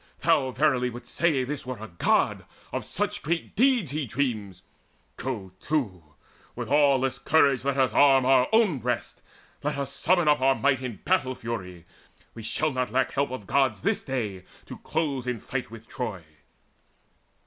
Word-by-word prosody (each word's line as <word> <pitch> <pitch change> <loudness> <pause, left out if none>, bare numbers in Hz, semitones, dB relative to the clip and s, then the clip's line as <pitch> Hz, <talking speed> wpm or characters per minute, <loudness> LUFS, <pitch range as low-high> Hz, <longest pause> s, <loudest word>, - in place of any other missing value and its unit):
Thou 130 - +3
verily 130 -2 +1
wouldst 120 0 -9
say 155 -6 +2
This 140 +2 -4
were 125 -1 -5
a 110 - -8
God, 85 - +1 0.3
of - - -2
such - - -2
great 165 +2 -3
deeds 240 - +3
he 150 -2 -2
dreams! 110 -7 -3 0.5
Go 105 -6 -5
to, 120 - -1 0.5
with - - -5
aweless 135 -3 +3
courage 140 -5 +3
let 140 0 0
us 130 -4 +2
arm 135 -2 +5
Our 130 -1 +5
own 220 - +3
breasts: 120 -1 -3 0.4
let - - -2
us 140 -1 -3
summon 175 +1 +2
up 150 -2 +4
our 135 0 +4
might 135 -2 +1
In 125 -5 -6
battle 130 -9 +1
fury. 90 -8 -6 0.5
We 115 - -9
shall 150 +7 -1
lack 125 -1 -1
not 130 0 +1
help 140 0 0
Of 125 -5 -6
Gods 130 -4 +1
this - - 0
day 105 -9 -3 0.2
to - - -9
close 140 -5 -2
in 125 -2 -2
fight 125 +1 -4
with 115 0 -12
Troy." 110 -9 -5
130 Hz, 170 wpm, -26 LUFS, 115-140 Hz, 0.5 s, arm